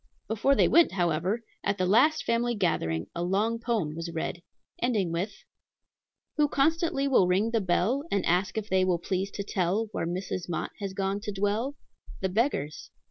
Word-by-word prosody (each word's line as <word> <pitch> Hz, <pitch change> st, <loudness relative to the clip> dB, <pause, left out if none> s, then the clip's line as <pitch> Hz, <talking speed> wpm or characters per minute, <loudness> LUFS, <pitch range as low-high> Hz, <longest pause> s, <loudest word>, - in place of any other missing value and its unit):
Before 225 Hz, +6 st, +2 dB
they -, -, +4 dB
went, 340 Hz, -, +5 dB
however, 180 Hz, +5 st, 0 dB, 0.2 s
at 200 Hz, -, 0 dB
the 185 Hz, -, +1 dB
last 250 Hz, +12 st, +4 dB
family 235 Hz, +1 st, +1 dB
gathering 80 Hz, -, 0 dB
a 170 Hz, -, -4 dB
long 205 Hz, +6 st, 0 dB
poem 225 Hz, -10 st, -1 dB
was 165 Hz, +1 st, -5 dB
read, 165 Hz, +1 st, -4 dB, 0.4 s
ending 215 Hz, -8 st, +1 dB
with: 185 Hz, +5 st, -3 dB, 0.9 s
"Who 300 Hz, -1 st, +4 dB
constantly 305 Hz, 0 st, +1 dB
will 250 Hz, -9 st, +4 dB
ring 195 Hz, +5 st, +2 dB
the 225 Hz, -2 st, +1 dB
bell, 205 Hz, -, +1 dB
And 200 Hz, -2 st, 0 dB
ask 180 Hz, +5 st, +1 dB
if 215 Hz, -1 st, -2 dB
they 190 Hz, -1 st, +2 dB
will 185 Hz, -2 st, +2 dB
please 185 Hz, +3 st, -2 dB
to 200 Hz, -, -5 dB
tell 195 Hz, +3 st, 0 dB
Where 165 Hz, -, -2 dB
Mrs. 180 Hz, 0 st, -4 dB
Mott 170 Hz, -, -2 dB
has 200 Hz, -2 st, -4 dB
gone 195 Hz, +1 st, -1 dB
to 210 Hz, 0 st, -5 dB
dwell? 205 Hz, +7 st, -1 dB, 0.4 s
The 190 Hz, -, -1 dB
beggars. 180 Hz, -, -1 dB
200 Hz, 180 wpm, -28 LUFS, 180-230 Hz, 0.9 s, went